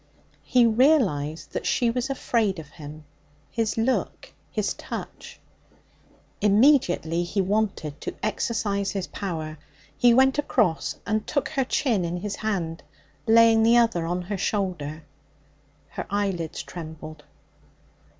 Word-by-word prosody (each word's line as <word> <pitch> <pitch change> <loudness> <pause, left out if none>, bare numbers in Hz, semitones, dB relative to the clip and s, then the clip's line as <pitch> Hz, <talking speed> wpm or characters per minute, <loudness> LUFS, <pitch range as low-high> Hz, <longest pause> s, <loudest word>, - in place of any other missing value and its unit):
He 250 -2 +3
realized 220 - +2
that - - -3
she 240 -2 +2
was 250 +2 -2
afraid 230 -7 0
of 155 -3 -9
him 155 -1 -10 0.5
his 225 -2 -1
look, 245 +3 -1 0.2
his - - -1
touch. - - -8 1.0
Immediately 205 - +3
he 175 +4 -3
wanted 190 -7 -1
to - - -5
exercise 200 -3 -1
his 195 -2 -3
power. 160 -6 -5 0.4
He 245 - +5
went 265 +4 +4
across 220 - +1
and 215 +1 -1
took 285 - -1
her 270 -4 0
chin 235 -7 +1
in 170 +1 -2
his 205 +2 -4
hand, 175 -7 -2 0.5
laying 225 0 +6
the 230 +2 +5
other 225 -9 +2
on 180 +1 -2
her 195 +2 -4
shoulder. 175 -7 -2 0.9
Her - - -6
eyelids 195 -5 -2
trembled. 155 -2 -9
200 Hz, 125 wpm, -25 LUFS, 165-230 Hz, 1.0 s, laying